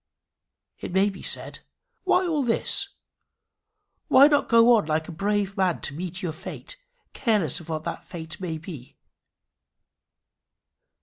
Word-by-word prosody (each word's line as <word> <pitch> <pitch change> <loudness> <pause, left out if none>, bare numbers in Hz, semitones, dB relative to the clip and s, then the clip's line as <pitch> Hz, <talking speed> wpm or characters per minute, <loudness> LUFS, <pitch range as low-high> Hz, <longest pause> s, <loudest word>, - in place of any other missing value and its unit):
It - - -6
may 195 +2 +3
be 190 - -11
said, - - -4 0.5
"Why 375 0 +3
all 315 -4 0
this? 275 - +1 1.2
Why 270 - +8
not 290 -1 +3
go 230 +1 +7
on 210 -9 +1
like 155 0 0
a - - -6
brave 200 +3 -1
man 185 -3 +1
to 140 - -3
meet 180 +4 -5
your 165 -3 -2
fate, 335 - -7 0.4
careless 215 - +1
of 170 - -13
what 155 -1 -3
that - - -5
fate 160 -1 -7
may 165 -3 -3
be?" 155 -6 -10
190 Hz, 140 wpm, -25 LUFS, 160-230 Hz, 1.2 s, Why